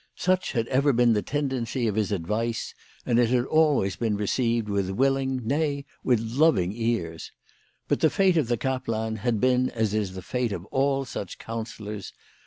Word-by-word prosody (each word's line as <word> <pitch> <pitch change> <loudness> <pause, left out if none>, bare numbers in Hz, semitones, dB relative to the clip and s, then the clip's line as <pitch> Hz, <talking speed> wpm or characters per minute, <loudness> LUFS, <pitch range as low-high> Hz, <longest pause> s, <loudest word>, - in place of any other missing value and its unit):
Such 185 0 0
had 115 -2 0
ever 140 +2 +3
been 120 -1 +4
the 105 - +1
tendency 130 -3 -2
of 110 - +1
his 105 0 0
advice, 105 +5 -2 0.3
and 120 0 +2
it 120 -2 +3
had 125 0 +2
always 145 -12 +2
been 110 -3 0
received 115 +2 0
with 100 -2 -1
willing, 130 +3 0
nay, 140 +2 0 0.2
with 125 -3 +3
loving 115 - +2
ears. 110 -9 -2 0.6
But - - +1
the 160 - +4
fate 190 -1 +3
of 155 -7 +2
the 120 0 +1
kaplan 115 -4 -2
had 115 +1 0
been 130 +1 +3
as 110 -3 -1
is 100 -3 -1
the 95 - -7
fate 125 +1 -1
of 90 -1 -6
all 135 0 +1
such 100 -7 -6
counsellors. 110 -3 -6
115 Hz, 180 wpm, -26 LUFS, 105-135 Hz, 0.6 s, been